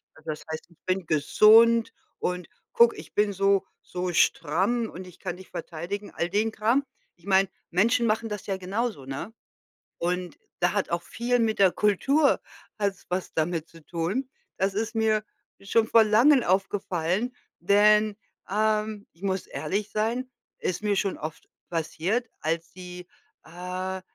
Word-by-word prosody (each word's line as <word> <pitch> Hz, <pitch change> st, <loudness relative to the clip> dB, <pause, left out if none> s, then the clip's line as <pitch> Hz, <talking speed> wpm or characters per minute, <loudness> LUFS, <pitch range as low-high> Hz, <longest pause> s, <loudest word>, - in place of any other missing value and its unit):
Also, 160 Hz, -, -11 dB
das 150 Hz, -, -7 dB
heißt, 160 Hz, -, -5 dB
ich 170 Hz, -, -23 dB
bin 185 Hz, -1 st, 0 dB
gesund 225 Hz, +9 st, +5 dB, 0.3 s
und 180 Hz, -1 st, -2 dB, 0.3 s
guck, 235 Hz, 0 st, +6 dB
ich -, -, -11 dB
bin 205 Hz, -1 st, +2 dB
so 195 Hz, 0 st, +2 dB, 0.2 s
so 180 Hz, 0 st, -4 dB
stramm 190 Hz, +10 st, +2 dB
und 185 Hz, +2 st, -8 dB
ich 180 Hz, -, -14 dB
kann 175 Hz, -, -4 dB
dich 190 Hz, -, -13 dB
verteidigen.” 185 Hz, +5 st, -5 dB
All 170 Hz, -, -1 dB
den 210 Hz, +4 st, +1 dB
Kram. 230 Hz, +6 st, +2 dB, 0.3 s
Ich 175 Hz, -, -24 dB
meine, 195 Hz, -1 st, +4 dB, 0.2 s
Menschen 230 Hz, +7 st, +3 dB
machen 225 Hz, +1 st, 0 dB
das 210 Hz, -2 st, -5 dB
ja 195 Hz, -2 st, -2 dB
genauso, 195 Hz, -, -3 dB
ne? 140 Hz, +11 st, -5 dB, 0.6 s
Und 180 Hz, 0 st, -2 dB, 0.2 s
da 175 Hz, -, +3 dB
hat 205 Hz, -2 st, 0 dB
auch 170 Hz, 0 st, 0 dB
viel 245 Hz, +1 st, 0 dB
mit 220 Hz, -2 st, +1 dB
der 190 Hz, -2 st, +6 dB
Kultur 275 Hz, -, +3 dB, 0.4 s
hat's 200 Hz, -2 st, -1 dB
was 180 Hz, +1 st, -3 dB
damit 160 Hz, 0 st, -1 dB
zu 165 Hz, -1 st, -17 dB
tun. 180 Hz, +11 st, -2 dB, 0.3 s
Das 195 Hz, +1 st, +1 dB
ist 225 Hz, +3 st, -2 dB
mir 220 Hz, -1 st, +2 dB, 0.4 s
schon 220 Hz, +3 st, +2 dB
vor 225 Hz, -1 st, +6 dB
Langem 245 Hz, +6 st, +5 dB
aufgefallen, 190 Hz, +3 st, 0 dB, 0.2 s
denn, 210 Hz, +3 st, +4 dB, 0.3 s
ähm, 215 Hz, 0 st, 0 dB
ich 165 Hz, -, -27 dB
muss 190 Hz, -1 st, -1 dB
ehrlich 195 Hz, +9 st, -3 dB
sein, 235 Hz, +4 st, -1 dB, 0.3 s
ist 180 Hz, +2 st, -2 dB
mir 205 Hz, -1 st, +2 dB
schon 195 Hz, -1 st, 0 dB
oft 155 Hz, +1 st, -7 dB, 0.2 s
passiert, 175 Hz, +8 st, -1 dB
als 165 Hz, +1 st, -2 dB
sie, 180 Hz, -1 st, -9 dB, 0.4 s
äh, 185 Hz, +2 st, -5 dB
195 Hz, 155 wpm, -26 LUFS, 180-220 Hz, 0.6 s, guck